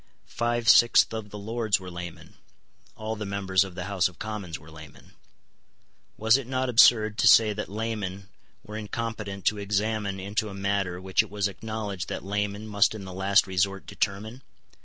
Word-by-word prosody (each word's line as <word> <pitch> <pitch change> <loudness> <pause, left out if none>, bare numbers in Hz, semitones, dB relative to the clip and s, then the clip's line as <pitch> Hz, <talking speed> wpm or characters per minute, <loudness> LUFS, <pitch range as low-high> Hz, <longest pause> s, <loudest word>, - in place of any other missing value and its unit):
Five 120 0 -2
sixths 120 -1 +6
of 110 -2 -5
the 105 - -8
Lords 110 0 0
were 90 -1 -9
laymen. 90 -1 -9 0.6
All 110 +1 -4
the 105 - -5
members 100 -1 +1
of 95 -2 -9
the 90 - -4
House 95 -2 +1
of 90 -2 -13
Commons 105 -6 -5
were 80 +1 -16
laymen. 80 -2 -14 1.0
Was 110 +3 +4
it 135 -3 -6
not 130 0 -1
absurd 110 -2 +5
to - - +4
say 110 +2 +7
that 105 -1 -5
laymen 100 -3 -4 0.4
were 105 +1 -8
incompetent 105 -3 -5
to 105 - +2
examine 100 0 -1
into 105 +3 -2
a 100 - -8
matter 100 -2 -1
which 95 0 +2
it - - -9
was 105 -1 -1
acknowledged 105 -1 -5
that - - -5
laymen 105 +1 -2
must 105 +1 +2
in 100 -3 -7
the 95 - -8
last 95 +2 +3
resort 95 +1 -1
determine? 110 +5 -3
100 Hz, 180 wpm, -26 LUFS, 95-110 Hz, 1.0 s, say